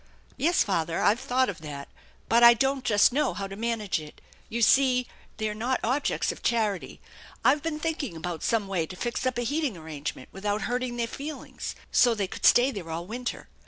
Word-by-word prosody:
" - - -35
Yes, 340 +5 +3
father, 170 -5 -1
I've 215 +4 +3
thought 260 0 +1
of 195 - -5
that, 145 -2 -7 0.4
but 235 +1 +4
I 235 0 +10
don't 270 +2 0
just 210 +2 +4
know 295 +3 +1
how 200 - -3
to 195 0 -7
manage 220 -4 -1
it. 150 -1 -12 0.3
You 235 +1 -1
see 255 0 +4 0.3
they're 215 -1 -2
not 240 +4 -1
objects 260 +5 0
of - - -10
charity. 215 -5 -1 0.5
I've 295 - +5
been 320 -1 -2
thinking 305 - -3
about 165 0 -5
some 220 -3 0
way 180 -5 -1
to 185 - -8
fix 240 +5 -2
up 255 - -1
a 240 - 0
heating 285 - -1
arrangement 150 -4 -6
without 205 +2 -2
hurting 245 0 -2
their 235 - 0
feelings, 285 +6 -7 0.2
so 240 -2 +5
they 205 -2 -1
could 185 - 0
stay 250 +3 +6
there 190 -8 -7
all 165 +1 -4
winter. 245 +5 -5
230 Hz, 200 wpm, -27 LUFS, 195-255 Hz, 0.5 s, I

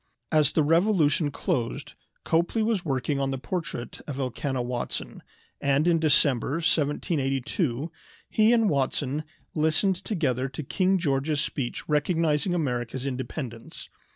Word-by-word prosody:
As 155 -3 +4
the 155 - +3
Revolution 165 -2 +3
closed 125 -4 -2 0.3
Copley 170 +7 +1
was 215 -4 +1
working 140 -1 -1
on 135 -1 0
the 135 - -2
portrait 155 -3 -5
of 140 -3 -4
Elkanah 130 0 -2
Watson, 120 0 -4 0.4
and 140 +3 +2
in 170 -1 +4
December, 140 -4 +3
1782, 145 - 0 0.4
he 215 +1 +4
and 230 -2 +4
Watson 140 -1 0 0.3
listened 160 +5 +2
together 140 - -1
to 135 +3 -6
King 190 +6 +2
George's 145 -2 0
speech 130 -5 -3
recognizing 160 +2 +1
America's 125 -4 -2
independence. 125 -2 -6
145 Hz, 125 wpm, -26 LUFS, 135-170 Hz, 0.4 s, As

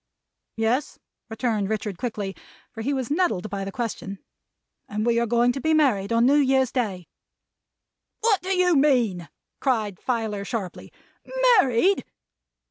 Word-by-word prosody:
"Yes," 230 +6 0 0.3
returned 225 -3 -1
Richard 210 -4 -3
quickly, 210 -5 -4 0.4
for 225 - -7
he 270 - -1
was 265 -2 -2
nettled 310 - 0
by 200 -1 -3
the 195 - -5
question. 200 -3 -4 0.7
"And 210 +1 -2
we 235 -1 +2
are 235 - 0
going 240 +2 +3
to 270 +2 -5
be 315 +3 +2
married 230 -10 +2
on 230 +1 +3
New 280 +3 +5
Year's 265 -3 +3
Day." 200 -9 -2 1.1
"What 435 -4 +3
do 370 - -6
you 365 -2 +3
mean?" 240 - +2 0.3
cried 215 -8 -1
Filer 220 -5 -2
sharply. 200 -4 -5 0.7
"Married!" 275 +8 +2
235 Hz, 140 wpm, -24 LUFS, 205-270 Hz, 1.1 s, New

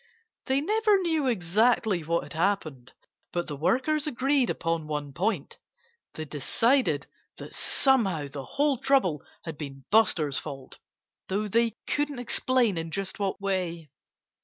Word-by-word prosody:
They 265 +1 +2
never 425 +4 +3
knew 320 -5 +1
exactly 215 -1 +2
what 170 +2 0
had - - -10
happened. 160 -8 -1 0.4
But 175 -1 -1
the 145 - -5
workers 260 - +1
agreed 270 -1 +1
upon 165 -2 -2
one 150 -2 -4
point. 185 0 -2 0.6
They 155 - -5
decided 155 - +1 0.3
that - - -9
somehow 195 - +2
the 140 0 -7
whole 285 -3 +1
trouble 225 - +2 0.2
had 160 -4 -7
been 135 -3 -8
Buster's 170 -10 +3
fault 135 -3 -9 0.5
though 205 +3 -1
they 230 +1 +1
couldn't 290 -2 -1
explain 245 -5 +1
in 165 0 -5
just 195 +5 -4
what 195 -1 -1
way. 180 -6 -2
195 Hz, 135 wpm, -27 LUFS, 155-255 Hz, 0.6 s, never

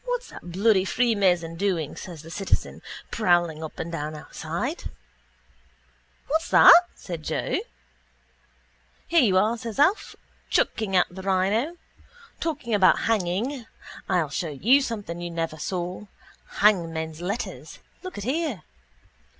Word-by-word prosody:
—What's - - -3
that 175 - -10
bloody 200 0 +3
freemason 190 -7 +1
doing, 175 -6 -1
says 170 -4 -9
the 165 - -11
citizen, 195 +2 -2 0.3
prowling 175 -6 +1
up 155 - -8
and 170 - -5
down 155 -1 -4
outside? 170 - -5 1.4
—What's 320 +3 0
that? 350 +1 +9
says 170 -3 -7
Joe. 155 - -1 1.5
—Here 335 -1 +4
you 195 -7 +3
are, 220 +4 +2
says 230 -2 -6
Alf, 370 +9 +2 0.3
chucking 205 -4 0
out 180 - +5
the 190 +2 -8
rhino. 195 - 0 0.6
Talking 295 -8 -3
about 195 -3 +5
hanging, 225 +5 -1 0.4
I'll 160 -5 +1
show 165 +3 -2
you 230 - +4
something 205 -9 -5
you 175 - -4
never 165 -2 -3
saw. 180 +4 -4 0.5
Hangmen's 165 -6 +2
letters. 200 +7 -5 0.2
Look 370 -1 -8
at 205 - -5
here. 265 - -2
190 Hz, 125 wpm, -25 LUFS, 170-235 Hz, 1.5 s, that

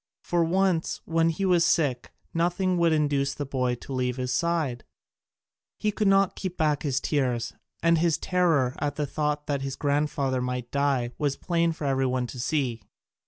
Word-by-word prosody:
For 175 -1 +1
once, 180 0 +1
when 165 0 +2
he 180 +4 -1
was 180 -2 +4
sick, 140 -9 +1 0.2
nothing 175 +2 +1
would 170 -1 +4
induce 145 -3 +1
the 145 - -4
boy 125 -2 0
to 135 - -9
leave 125 -1 -1
his 125 -1 -2
side; 160 -8 0 0.9
he 210 - 0
could 210 0 0
not 195 -1 +4
keep 185 -2 -5
back 150 -2 +1
his 140 -3 0
tears, 125 -7 -1 0.3
and 165 -1 +4
his 165 -2 +2
terror 165 -9 +1
at 145 -1 -1
the 150 - -1
thought 150 +1 -2
that 140 -2 -1
his 135 0 -3
grandfather 140 -3 0
might 125 -1 -3
die 140 -4 +1
was 145 -2 0
plain 170 -1 +1
for 160 -2 -5
every 135 -1 +1
one 125 -1 0
to 125 +1 -8
see. 125 -4 -1
145 Hz, 180 wpm, -26 LUFS, 130-170 Hz, 0.9 s, was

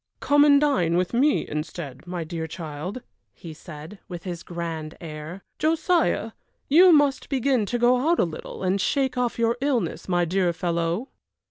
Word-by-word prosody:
"Come 290 0 +4
and 285 -1 +6
dine 255 - +2
with 180 +3 -1
me 280 +5 +2
instead, 150 -1 -6
my 175 -1 -3
dear 160 0 -5
child," 165 +7 -6 0.3
he 165 -4 -9
said, 155 +4 -11
with 175 -2 -7
his 175 -3 -5
grand 165 -2 -6
air. 160 +3 -8 0.2
"Josiah, 320 - +1 0.4
you 350 +6 +7
must 290 -3 +3
begin 260 -5 +1
to 245 - -1
go 240 +1 +4
out 340 - +3
a - - +3
little 165 +3 -7
and 190 +1 +1
shake 265 +1 0
off 250 -1 -1
your 230 +1 +1
illness, 245 - -1
my 175 -1 +2
dear 180 0 +1
fellow." 170 - -2
185 Hz, 165 wpm, -24 LUFS, 165-265 Hz, 0.4 s, you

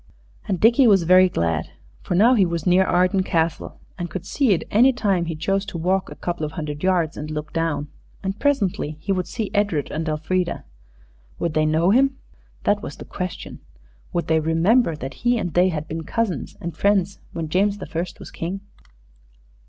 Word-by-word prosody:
And 190 -4 -1
Dickie 235 - +5
was 195 -5 +5
very 185 +2 +6
glad. 85 - -1 0.3
For 180 - -2
now 225 +7 +6
he 215 -6 +4
was 170 -3 -2
near 185 +1 +5
Arden 185 +1 +2
Castle, 165 -3 -1 0.2
and 175 0 -3
could 185 - -6
see 275 -6 +1
it 180 - +2
any 245 +6 +6
time 200 -8 0
that - - -7
he 165 - -3
chose 195 +5 0
to 170 - -5
walk 185 +3 0
a - - -9
couple 175 -2 -4
of 150 +1 -3
hundred 150 -2 -5
yards 175 -4 +1
and 150 +1 -5
look 150 0 -5
down. 165 -3 -1 0.4
And 195 +2 -3
presently 200 - 0
he 195 - -3
would 185 -2 0
see 220 -4 -4
Edred 200 -8 0
and 160 +1 -2
Elfrida. 170 +4 -1 0.7
Would 170 -2 -2
they 155 0 +2
know 160 +4 +3
him? 270 +3 +3 0.5
That 205 0 +2
was 145 - -7
the - - -10
question. 180 -1 -6 0.5
Would 175 - -1
they 160 0 +2
remember 165 +6 +2
that 135 -2 -6
he 240 0 +2
and 175 -7 -3
they 180 +1 +4
had 155 -3 -4
been 160 +1 -5
cousins 185 - -2
and 170 -2 -6
friends 195 0 +1
when 165 -1 -3
James 200 +5 +1
the 205 - -7
First 170 +2 -5
was - - -10
King? 185 +4 -4
180 Hz, 200 wpm, -22 LUFS, 160-200 Hz, 0.7 s, very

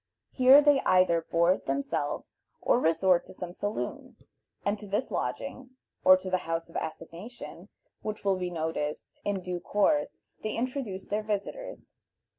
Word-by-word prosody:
Here 265 +3 +7
they 290 -2 +5
either 185 -2 +4
board 170 +3 +2
themselves 140 +1 -2 0.2
or - - +3
resort 170 0 +3
to - - -12
some 175 -1 -6
saloon, 205 +3 -4 0.5
and 205 +1 0
to 210 - -9
this 210 +6 -1
lodging, 260 0 -4 0.3
or 185 0 +8
to 185 0 -6
the 185 - +3
house 165 0 -2
of - - -20
assignation, 170 +9 -7 0.3
which 215 -1 -5
will 195 -1 +3
be 180 -1 -2
noticed 160 -3 -4
in 200 -2 -1
due 180 -1 -3
course, 250 - +1 0.2
they 215 - -2
introduce 235 -5 -3
their 210 +1 -1
visitors. 215 - -5
190 Hz, 150 wpm, -29 LUFS, 170-225 Hz, 0.5 s, or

